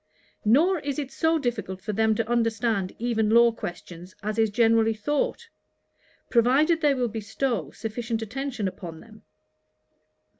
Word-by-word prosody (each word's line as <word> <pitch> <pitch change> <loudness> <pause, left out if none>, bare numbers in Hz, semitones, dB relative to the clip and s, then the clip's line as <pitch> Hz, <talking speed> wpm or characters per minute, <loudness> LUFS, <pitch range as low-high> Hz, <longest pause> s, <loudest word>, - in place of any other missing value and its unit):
Nor 320 - +4
is 280 -1 -4
it 280 -3 -4
so 320 +3 +1
difficult 225 - -3
for 205 +3 -4
them 220 +1 +2
to 225 0 -1
understand 225 -4 0
even 225 -2 0
law 235 +1 +6
questions, 175 -3 -8
as 215 +2 -2
is 220 -1 +3
generally 225 0 +3
thought; 295 - -2 0.8
provided 275 +8 +3
they 290 -3 +3
will 250 -2 0
bestow 225 +3 -2
sufficient 225 0 -4
attention 250 -1 -3
upon 170 -3 -7
them. 220 -2 -16
230 Hz, 140 wpm, -25 LUFS, 215-260 Hz, 0.8 s, law